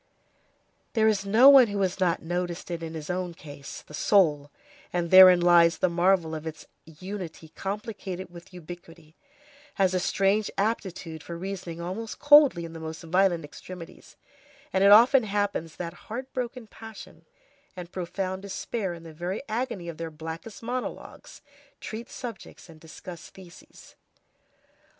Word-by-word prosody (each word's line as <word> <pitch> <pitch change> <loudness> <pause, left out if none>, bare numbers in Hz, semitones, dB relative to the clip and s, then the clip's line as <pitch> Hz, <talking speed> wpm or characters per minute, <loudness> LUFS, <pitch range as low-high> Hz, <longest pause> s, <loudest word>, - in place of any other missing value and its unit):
There 220 -2 +3
is 200 -2 +1
no 225 +7 +6
one 270 -3 +9
who 205 -1 -3
has 190 0 -1
not 175 -3 +1
noticed 175 +1 -4
it 170 -1 -4
in 165 0 -6
his 155 +1 -5
own 180 -1 -3
case—the 145 -1 -11
soul,—and 165 0 0
therein 185 -1 +9
lies 175 -1 +5
the 185 - +2
marvel 175 -1 +2
of 160 0 -5
its 160 0 -8 0.2
unity 165 -1 -8
complicated 195 -1 -6
with 175 +2 -13
ubiquity, 170 -2 -12 0.6
has 190 -2 +2
a 185 - +1
strange 195 +3 +1
aptitude 190 -6 -2
for 170 +2 -7
reasoning 180 -2 -6
almost 195 +6 -5
coldly 290 - +6
in 165 - -9
the 165 - -8
most 160 +1 -7
violent 175 -1 +2
extremities, 170 +3 -11 0.6
and 190 - +2
it 200 - +7
often 240 +5 +8
happens 205 -6 -2
that 170 -2 -5 0.2
heartbroken 250 0 -5
passion 220 0 -12 0.5
and 180 -1 -8
profound 185 +1 -4
despair 195 -1 -4
in 165 - -12
the 165 -1 -11
very 180 - -4
agony 220 -6 -3
of 165 -2 -6
their 165 -1 -5
blackest 160 +8 -8
monologues, 250 +4 -6 0.4
treat 225 +2 -7
subjects 235 -7 -9
and 160 -1 -14
discuss 165 +2 -11
theses. 180 -2 -16
180 Hz, 145 wpm, -27 LUFS, 165-205 Hz, 0.6 s, one